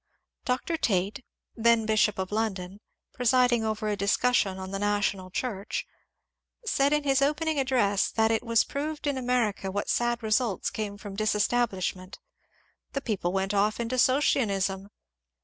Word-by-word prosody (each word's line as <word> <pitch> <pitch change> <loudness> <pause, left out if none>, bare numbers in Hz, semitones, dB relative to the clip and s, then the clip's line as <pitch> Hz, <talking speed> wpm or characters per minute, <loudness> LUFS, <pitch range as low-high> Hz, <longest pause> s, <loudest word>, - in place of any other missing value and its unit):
Dr. 260 +6 -1
Tait, 200 - 0 0.3
then 230 -1 +3
bishop 215 -1 +2
of 190 0 -3
London, 200 -3 -2 0.3
presiding 245 -1 +3
over 215 0 -2
a 210 - 0
discussion 200 0 +1
on 190 0 -7
the 195 - -3
national 205 -2 0
Church, 240 - -3 0.8
said 280 -9 +2
in 300 0 +2
his 275 -1 +2
opening 305 +2 +1
address 240 -7 +2
that 220 0 +2
it 225 - +1
was 230 -1 +3
proved 300 +2 -4
in 285 -1 0
America 245 -6 0
what 205 +2 -3
sad 240 0 0
results 220 -1 0
came 205 -2 -4
from 205 -1 -8
disestablishment, 205 -3 -1 0.4
— - - -39
^^ - - -40
the 275 - -2
people 200 -8 -2
went 195 +1 -1
off 205 +2 +1
into 235 +2 -1
Socinianism." 200 -8 +1
220 Hz, 150 wpm, -27 LUFS, 200-250 Hz, 0.8 s, then